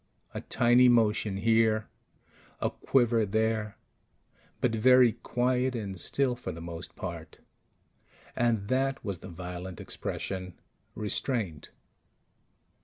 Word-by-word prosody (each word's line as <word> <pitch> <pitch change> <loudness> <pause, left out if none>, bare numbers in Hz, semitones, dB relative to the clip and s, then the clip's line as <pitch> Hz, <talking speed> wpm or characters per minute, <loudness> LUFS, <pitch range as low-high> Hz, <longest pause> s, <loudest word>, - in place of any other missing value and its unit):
A - - -4
tiny 120 +1 +4
motion 110 -4 +2
here, 110 0 +2 0.7
a - - 0
quiver 120 -4 +2
there, 110 0 -1 0.8
but 120 - +1
very 125 +2 +6
quiet 125 +3 0
and 100 -4 -4
still 135 +3 0
for 120 -6 -6
the 85 - -8
most 85 0 -7
part. - - -7 1.0
And 115 -4 +1
that 135 +2 0
was 100 -5 -3
the 95 - -10
violent 90 0 -7
expression: 95 -2 -5 0.4
restraint. 105 - -2
110 Hz, 105 wpm, -29 LUFS, 95-120 Hz, 1.0 s, very